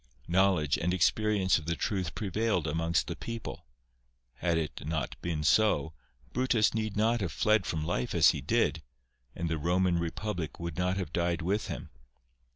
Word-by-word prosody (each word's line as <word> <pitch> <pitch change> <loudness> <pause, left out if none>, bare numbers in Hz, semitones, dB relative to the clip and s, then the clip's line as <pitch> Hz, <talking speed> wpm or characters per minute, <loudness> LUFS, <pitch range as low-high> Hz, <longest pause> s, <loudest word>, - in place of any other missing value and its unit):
Knowledge 90 -5 +2
and 90 +2 0
experience 95 0 +2
of 80 - -11
the 85 - 0
truth 95 -1 -2
prevailed 105 -3 0
amongst 80 +1 0
the - - -4
people. 115 - -7 0.7
Had 85 -2 +1
it 80 -2 -3
not 80 -4 -2
been 80 -3 -2
so, 80 -2 +3 0.4
Brutus 125 -4 +2
need 110 -2 -2
not 115 +2 +2
have 95 - -2
fled 105 -3 +2
from 80 -2 -2
life 65 -7 -2
as - - +7
he - - -5
did, 80 - +1 0.5
and 85 - -2
the 80 0 -1
Koman 90 +2 +2
republic 85 0 -4
would 85 -2 -4
not 90 +1 0
have 90 -5 -4
died 85 0 0
with 100 +5 0
him. - - -6
90 Hz, 165 wpm, -30 LUFS, 80-105 Hz, 0.7 s, as